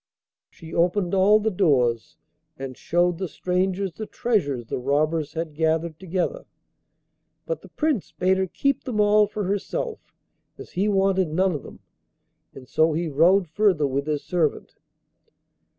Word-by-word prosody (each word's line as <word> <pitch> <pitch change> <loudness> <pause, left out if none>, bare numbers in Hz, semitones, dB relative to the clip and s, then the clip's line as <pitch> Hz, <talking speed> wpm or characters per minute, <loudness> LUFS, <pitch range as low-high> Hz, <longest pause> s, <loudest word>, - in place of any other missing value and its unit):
She 165 0 -12
opened 175 +2 +1
all 195 +3 +5
the 220 +1 0
doors, 125 - +1 0.4
and 135 -1 -6
showed 175 +3 0
the 190 - -2
strangers 185 +2 -1
the 215 +3 -7
treasures 145 - -1
the - - -4
robbers 150 +4 0
had 160 -1 -4
gathered 160 +1 0
together; 190 - -3 1.0
but - - -3
the - - -14
Prince 300 - -1
bade 190 +1 +1
her 190 0 0
keep 275 +9 -1
them 235 -5 -2
all 210 0 +5
for 210 0 -4
herself, 205 - -2 0.6
as - - -11
he 195 +4 0
wanted 195 -2 +2
none 185 +5 +1
of 150 -5 -4
them, - - -13 0.7
and 130 -2 -11
so 160 +3 +2
he 165 +1 -1
rode 175 +6 +4
further 180 -2 +2
with 140 +1 -2
his 150 -2 -1
servant. 170 -5 -1
180 Hz, 150 wpm, -24 LUFS, 155-200 Hz, 1.0 s, all